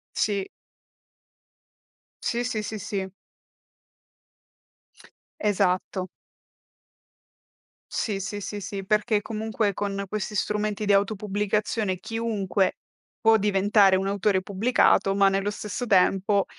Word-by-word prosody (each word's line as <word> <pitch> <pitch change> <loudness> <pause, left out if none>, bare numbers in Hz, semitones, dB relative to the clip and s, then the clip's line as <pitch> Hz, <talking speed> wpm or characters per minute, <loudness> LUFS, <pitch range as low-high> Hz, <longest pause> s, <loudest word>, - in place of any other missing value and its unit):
Sì. 200 -2 0 1.8
Sì, 240 +1 0
sì, 230 -3 -2
sì, 215 0 -5
sí. 195 -2 -3 2.3
Esatto. 185 -2 0 1.8
Sì, 205 -3 -1
sì, 205 +1 -5
sì, 205 +1 -5
sí, 195 0 -5
perché 210 0 +2
comunque 215 -1 -2
con 200 0 -3
questi 215 0 -3
strumenti 210 0 -1
di 200 - +3
auto 200 +2 +2
pubblicazione 205 -1 -1
chiunque 215 -4 -1 0.4
può 225 0 +6
diventare 200 -1 +4
un 190 +1 0
autore 200 -1 +1
pubblicato, 200 0 +2
ma 200 -1 +5
nello 195 +1 0
stesso 210 +4 -5
tempo, 195 0 +3
205 Hz, 100 wpm, -25 LUFS, 195-215 Hz, 2.3 s, può